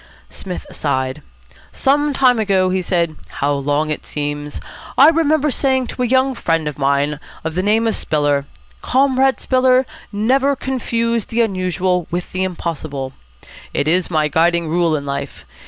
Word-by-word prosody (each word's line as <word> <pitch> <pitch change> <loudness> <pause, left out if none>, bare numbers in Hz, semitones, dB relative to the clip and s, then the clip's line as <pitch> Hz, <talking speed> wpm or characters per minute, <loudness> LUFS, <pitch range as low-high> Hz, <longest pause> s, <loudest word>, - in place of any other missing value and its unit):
Psmith 180 -2 -6
sighed. 130 -3 -2 0.5
"Some 290 +2 +2
time 255 -3 +3
ago," 190 -3 +2
he 185 0 0
said, 170 -3 0
" - - -26
how 145 +1 +2
long 145 +2 0
it 155 - -3
seems! 145 0 -4 0.4
I 285 +3 +8
remember 310 -2 +2
saying 260 -1 +1
to - - -5
a 250 - +2
young 260 +2 +2
friend 165 -9 -1
of 150 -1 -5
mine 140 +1 +1 0.2
of 160 0 -3
the 180 - 0
name 215 +3 +2
of 225 - +1
Spiller, 145 -2 0 0.3
'Comrade 265 0 +2
Spiller, 255 0 +3 0.3
never 260 +7 +2
confuse 235 -4 -1
the 235 +1 0
unusual 185 -4 0
with 175 +1 -4
the 185 0 -1
impossible.' 155 -7 -4 0.6
It 145 - 0
is 180 +3 +2
my 155 -3 +1
guiding 170 +1 +2
rule 170 -1 +2
in 140 -1 -4
life. 140 0 -5
185 Hz, 160 wpm, -18 LUFS, 150-255 Hz, 0.6 s, I